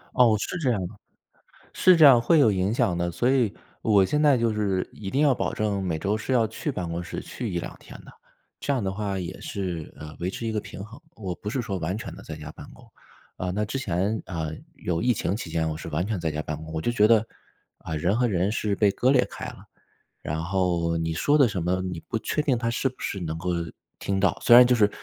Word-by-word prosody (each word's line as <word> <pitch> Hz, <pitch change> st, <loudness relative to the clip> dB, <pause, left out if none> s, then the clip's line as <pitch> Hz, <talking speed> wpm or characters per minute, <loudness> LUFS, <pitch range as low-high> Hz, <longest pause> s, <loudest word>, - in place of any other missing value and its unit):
哦， 115 Hz, -4 st, +5 dB
是 180 Hz, -, -3 dB
这 140 Hz, -6 st, +1 dB
样 115 Hz, -5 st, +1 dB
的， -, -, -11 dB, 0.8 s
是 185 Hz, -1 st, +5 dB
这 160 Hz, -, +7 dB
样 130 Hz, -4 st, +9 dB
会 155 Hz, +8 st, +4 dB
有 120 Hz, -7 st, +6 dB
影 95 Hz, +1 st, 0 dB
响 115 Hz, -7 st, +1 dB
的。 85 Hz, 0 st, -1 dB
所 105 Hz, +9 st, +1 dB
以 125 Hz, -6 st, +2 dB, 0.3 s
我 105 Hz, -3 st, +5 dB
现 150 Hz, +10 st, +1 dB
在 145 Hz, -4 st, +5 dB
就 115 Hz, -1 st, +1 dB
是 100 Hz, -3 st, 0 dB
一 95 Hz, -2 st, -7 dB
定 135 Hz, -, +1 dB
要 145 Hz, -3 st, +5 dB
保 -, -, -2 dB
证 105 Hz, -2 st, -1 dB
每 85 Hz, -4 st, -1 dB
周 100 Hz, +6 st, 0 dB
是 110 Hz, +4 st, -3 dB
要 120 Hz, -3 st, +4 dB
去 115 Hz, +7 st, -4 dB
办 90 Hz, -10 st, -4 dB
公 85 Hz, +1 st, -3 dB
室 85 Hz, -, -6 dB
去 115 Hz, -6 st, -5 dB
1，2 85 Hz, -1 st, -4 dB
天 -, -, -12 dB
的， -, -, -14 dB, 0.5 s
这 145 Hz, -, -1 dB
样 130 Hz, -4 st, 0 dB
的 95 Hz, -1 st, -1 dB
话 100 Hz, -1 st, -3 dB
也 90 Hz, 0 st, -6 dB
是， 90 Hz, -5 st, -4 dB
呃， 75 Hz, 0 st, -9 dB
维 90 Hz, +2 st, -1 dB
持 115 Hz, -, -5 dB
一 110 Hz, -, -1 dB
个 105 Hz, -, -1 dB
平 95 Hz, -, -9 dB
衡， 110 Hz, +3 st, -13 dB, 0.2 s
我 95 Hz, -5 st, -4 dB
不 105 Hz, -, -6 dB
是 130 Hz, -, -1 dB
说 100 Hz, -5 st, -3 dB
完 90 Hz, +3 st, -2 dB
全 110 Hz, -, -7 dB
地 -, -, -11 dB
在 80 Hz, -, -7 dB
家 75 Hz, -1 st, -8 dB
办 -, -, -11 dB
公。 -, -, -16 dB, 0.5 s
啊， 90 Hz, -, -3 dB
那 105 Hz, +4 st, -1 dB
之 105 Hz, -, -4 dB
前， 100 Hz, -2 st, -1 dB
啊， 80 Hz, -4 st, -3 dB, 0.3 s
有 90 Hz, -10 st, -2 dB
疫 125 Hz, +1 st, +3 dB
情 100 Hz, -4 st, -1 dB
期 100 Hz, -7 st, -6 dB
间 80 Hz, 0 st, 0 dB
我 80 Hz, -, -3 dB
是 80 Hz, -, -7 dB
完 80 Hz, +3 st, -1 dB
全 105 Hz, -4 st, -2 dB
在 80 Hz, -1 st, -1 dB
家 75 Hz, 0 st, -3 dB
办 75 Hz, 0 st, -4 dB
公， 80 Hz, +1 st, -9 dB
我 80 Hz, -, -2 dB
就 120 Hz, -, 0 dB
觉 105 Hz, -2 st, +4 dB
得， 110 Hz, -1 st, +4 dB, 0.5 s
啊， 80 Hz, -, -5 dB
人 90 Hz, +7 st, +1 dB
和 120 Hz, 0 st, +2 dB
人 95 Hz, 0 st, +1 dB
是 105 Hz, -3 st, -1 dB
被 105 Hz, -1 st, +4 dB
割 125 Hz, +6 st, +2 dB
裂 130 Hz, -2 st, +4 dB
开 -, -, -7 dB
了。 -, -, -10 dB, 0.6 s
然 80 Hz, +1 st, -2 dB
后 85 Hz, -2 st, 0 dB
你 80 Hz, 0 st, -1 dB
说 145 Hz, -, +2 dB
的 140 Hz, -4 st, +6 dB
什 100 Hz, -5 st, -3 dB
么， 90 Hz, +2 st, 0 dB
你 90 Hz, -3 st, -4 dB
不 115 Hz, -, -1 dB
确 150 Hz, -, -1 dB
定 140 Hz, -4 st, +1 dB
他 115 Hz, 0 st, -1 dB
是 120 Hz, -, 0 dB
不 130 Hz, -, -17 dB
是 100 Hz, -, -3 dB
能 80 Hz, -3 st, -4 dB
够 90 Hz, +2 st, -3 dB, 0.5 s
听 95 Hz, -1 st, -1 dB
到， 95 Hz, -4 st, +2 dB
虽 120 Hz, -, +7 dB
然 125 Hz, +1 st, +10 dB
就 125 Hz, -, +4 dB
是 105 Hz, -3 st, +4 dB
100 Hz, 275 characters per minute, -25 LUFS, 85-115 Hz, 0.8 s, 然